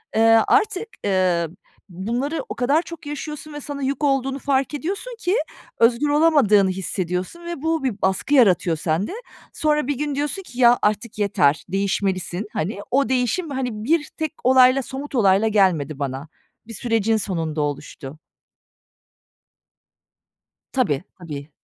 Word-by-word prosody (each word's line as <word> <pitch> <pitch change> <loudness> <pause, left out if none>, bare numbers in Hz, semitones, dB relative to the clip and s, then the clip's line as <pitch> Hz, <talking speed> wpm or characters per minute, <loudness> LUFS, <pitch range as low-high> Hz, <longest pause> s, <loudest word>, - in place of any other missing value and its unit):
eee, 220 - +3 0.3
artık, 415 0 +2 0.2
ııı, 180 -4 +1 0.3
bunları 240 - -3
o - - -4
kadar 275 +6 +2
çok 335 -3 -10
yaşıyorsun 300 +1 -6
ve 295 - -6
sana 285 0 -6
yük 275 +3 -2
olduğunu 270 -1 +1
fark 275 +1 0
ediyorsun 390 - -4
ki 375 -2 0 0.4
özgür 235 +5 +3
olamadığını 290 -11 +4
hissediyorsun 185 - -3
ve 340 -5 -5
bu, 320 -1 0
bir 230 -6 -2
baskı 190 +9 0
yaratıyor 185 - +4
sende. 165 +5 -1 0.4
Sonra 300 -3 +1
bir 285 -2 -1
gün 295 0 -2
diyorsun 295 +7 -2
ki, 255 -8 -11
"Ya, 240 -1 +6
artık 215 +2 -1
yeter, 160 -8 +2
değişmelisin." 195 0 -1
Hani, 190 +6 -3
o 270 -2 +2
değişim, 260 +7 0
hani, 265 -2 -2
1 310 +4 +1
tek 315 -1 -2
olayla, 255 +1 +5
somut 275 +2 -7
olayla 200 -2 +4
gelmedi 175 -9 +2
bana. 135 +1 -4 0.4
Bir 230 - -8
sürecin 225 -1 +1
sonunda 165 -6 -2
oluştu. 145 -1 -5 2.6
Tabii. 180 - +1 0.2
Tabii. 150 -4 -8
240 Hz, 140 wpm, -22 LUFS, 185-290 Hz, 2.6 s, Ya